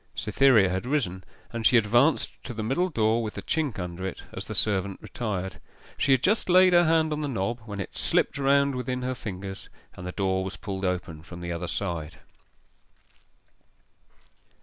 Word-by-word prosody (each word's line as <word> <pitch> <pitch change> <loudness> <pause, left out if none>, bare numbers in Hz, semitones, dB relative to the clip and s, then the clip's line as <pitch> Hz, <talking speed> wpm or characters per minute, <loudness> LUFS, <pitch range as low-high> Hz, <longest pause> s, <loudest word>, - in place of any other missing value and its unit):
Cytherea 130 -8 +4
had 95 +6 -2
risen, 110 -11 -1 0.3
and 115 -1 -3
she 120 - +6
advanced 120 +8 +2
to 120 - -6
the 110 - -3
middle 155 +11 +1
door 115 -5 +2
with 110 -2 -4
the - - -6
chink 155 -7 -1
under 90 0 -5
it 95 - -5
as - - -6
the - - -6
servant 100 -2 0
retired. 100 -6 -4 0.3
She 140 - +1
had 130 -1 +4
just 210 0 +2
laid 185 0 +6
her 175 0 +6
hand 160 -1 +3
on 150 - -3
the 150 - -1
knob, 115 -2 -2
when 105 -2 -6
it 100 - -6
slipped 140 - +1
round 140 0 +3
within 125 0 -3
her 130 0 -1
fingers, 95 -4 -7 0.3
and 90 - -7
the - - -3
door 95 -1 0
was 95 +1 -6
pulled 95 -2 -4
open 90 -4 -2
from 85 +2 -10
the 85 0 -4
other 85 +1 -3
side. 80 -5 -3
110 Hz, 185 wpm, -27 LUFS, 95-135 Hz, 0.3 s, she